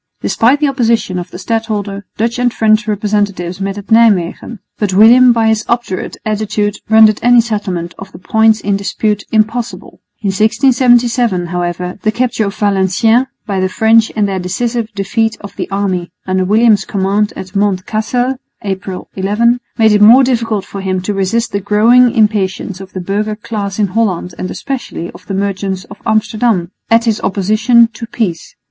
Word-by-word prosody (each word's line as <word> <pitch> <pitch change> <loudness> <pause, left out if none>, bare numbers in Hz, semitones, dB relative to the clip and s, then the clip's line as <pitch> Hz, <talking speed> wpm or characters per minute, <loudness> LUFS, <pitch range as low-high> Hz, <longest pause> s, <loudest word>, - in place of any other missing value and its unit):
Despite 250 +6 +2
the 300 - +2
opposition 230 -8 0
of 175 - -7
the - - -9
stadholder, 205 -1 -3
Dutch 235 +2 -1
and 245 -1 +2
French 215 -1 +2
representatives 205 -3 -2
met 195 +1 -3
at 205 +2 -10
Nijmwegen; 220 -1 +2 0.2
but 200 -3 -1
William 240 +5 +7
by 225 -1 +2
his 220 0 +1
obdurate 235 -6 -2
attitude 210 -1 -1
rendered 220 -1 +5
any 245 0 +5
settlement 195 -7 -2
of 195 0 -10
the - - -12
points 220 +4 +2
in 200 0 0
dispute 205 +1 -2
impossible. 225 +2 -2 0.2
In 200 - 0
1677, 235 -1 +2
however, 180 +1 -4
the 215 - +1
capture 230 -2 -1
of 200 - -5
Valenciennes 205 +5 +2 0.2
by 200 -3 -2
the 185 0 0
French 225 +1 +3
and 210 -2 +1
their 190 -1 -2
decisive 230 +5 -3
defeat 225 +3 -1
of 200 -1 -11
the - - -4
allied 195 +1 -2
army 180 -3 -2
under 185 0 0
William's 215 0 +3
command 200 +2 -1
at 190 +1 -9
Mont 200 -2 0
Cassel 245 +4 -1 0.3
(April 190 -2 -5
11) 220 +5 +1 0.2
made 220 -1 +4
it 210 0 +3
more 235 +6 +7
difficult 230 -6 -1
for 200 - -7
him 185 -1 -1
to 205 - -2
resist 205 +5 -1
the 200 - -1
growing 225 +5 +4
impatience 205 -4 -1
of 190 -1 -11
the 185 - -5
burgher 210 +3 -2
class 210 -2 -5
in 210 - +2
Holland 185 -4 -1
and 185 - -4
especially 260 -10 -5
of 180 +1 -16
the 195 - -3
merchants 195 -1 -2
of 200 - -12
Amsterdam 215 -4 0 0.2
at 230 +1 +3
his 220 -2 0
opposition 215 +5 +3
to 230 +1 -8
peace. 195 -8 -4
210 Hz, 175 wpm, -14 LUFS, 195-230 Hz, 0.3 s, William